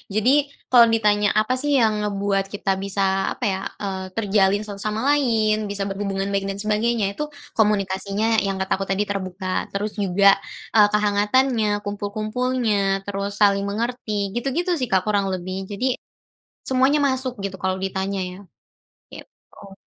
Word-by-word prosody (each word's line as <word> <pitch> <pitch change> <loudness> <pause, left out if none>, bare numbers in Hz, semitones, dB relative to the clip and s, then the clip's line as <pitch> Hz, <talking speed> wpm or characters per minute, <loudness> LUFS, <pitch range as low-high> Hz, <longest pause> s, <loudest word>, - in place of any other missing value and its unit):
Jadi 215 +5 +3 0.4
kalau 235 -2 +8
ditanya 210 -2 +3
apa 215 +4 +2
sih 290 +1 0
yang 220 -2 +3
ngebuat 200 -1 0
kita 195 -1 -1
bisa, 200 0 -2 0.3
apa - - -9
ya, 190 - -2 0.2
eee, 190 -1 -3
terjalin 205 -2 +2
satu 200 -1 -7
sama 215 +1 -2 0.2
lain, 215 -6 +1
bisa 200 -1 -2
berhubungan 195 0 -2
baik 195 0 -1
dan 195 0 -4
sebagainya. 215 +1 +1
Itu 300 - -3 0.3
komunikasinya 205 +1 +1
yang 195 - -1
kata 190 - -3
aku 195 - -2
tadi 195 +2 +1
terbuka, 190 -2 -5 0.2
terus 205 +1 -3
juga, 195 +1 +4 0.4
eee, 210 -2 +7
kehangatannya, 210 +3 +2 0.2
kumpul-kumpulnya, 210 -1 -1
terus 200 0 -3
saling 200 -1 +4
mengerti, 215 -2 -2
gitu-gitu 285 +9 -1
sih, 255 - -1
Kak, 190 -1 +3
kurang 205 -2 +1
lebih. 185 +1 -5
Jadi 205 +6 -2 0.8
semuanya 265 +3 +3
masuk 260 -1 0
gitu 195 -1 -4
kalau 190 0 0
ditanya 190 0 -2
ya. 180 0 -7 0.7
Gitu. 195 -1 -14
205 Hz, 150 wpm, -22 LUFS, 195-220 Hz, 0.8 s, kalau